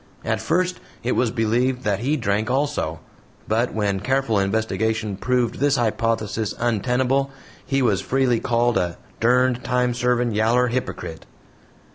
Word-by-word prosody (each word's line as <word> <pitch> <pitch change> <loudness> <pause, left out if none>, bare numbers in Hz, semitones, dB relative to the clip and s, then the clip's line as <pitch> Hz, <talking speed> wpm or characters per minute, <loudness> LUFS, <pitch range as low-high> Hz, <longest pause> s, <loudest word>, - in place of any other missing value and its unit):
At - - 0
first 180 +2 0 0.2
it 125 - 0
was 125 - +2
believed 125 +3 0
that 100 -2 0
he 140 +7 0
drank 110 -2 0
also, 135 - -1 0.5
but 115 +3 +1
when 100 -3 -1
careful 130 -3 +1
investigation 110 +1 -1
proved 125 +3 0
this 145 0 +3
hypothesis 110 -2 -1
untenable, 125 +4 +1 0.3
he 135 -1 0
was 105 -6 +2
freely 130 -3 +1
called 120 0 +1
a 85 -2 -2 0.2
"derned 125 +1 +2
time 125 -1 +1
servin', 125 0 +1
yaller 115 +4 +2
hypocrite." 115 -9 -4
120 Hz, 135 wpm, -22 LUFS, 110-130 Hz, 0.5 s, this